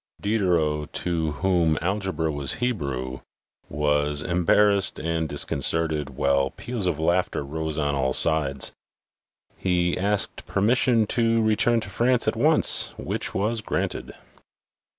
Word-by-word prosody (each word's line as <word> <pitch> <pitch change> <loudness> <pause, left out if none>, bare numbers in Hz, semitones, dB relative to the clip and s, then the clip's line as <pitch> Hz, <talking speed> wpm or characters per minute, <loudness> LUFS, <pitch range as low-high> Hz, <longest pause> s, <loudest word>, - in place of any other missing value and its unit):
Diderot, 85 -8 0
to 80 -3 -2
whom 85 -5 +2
algebra 90 -4 -2
was 70 -2 -2
Hebrew, 70 - -3 0.5
was 75 0 0
embarrassed 95 +3 +2
and 80 -1 -2
discon 70 0 -2
certed, 80 -2 +1
while 70 0 +1
peals 120 - -4
of 85 -4 0
laughter 85 -2 0
rose 80 +2 -4
on 75 -2 0
all 65 -1 0
sides. 80 +2 +1 0.9
He 90 -1 0
asked 100 +2 -1
permission 115 +2 +2
to 115 -1 +2
return 110 +2 +2
to - - -7
France 125 0 +1
at - - +1
once, - - +4
which - - -4
was 110 +3 -1
granted. - - -3
85 Hz, 125 wpm, -24 LUFS, 75-105 Hz, 0.9 s, once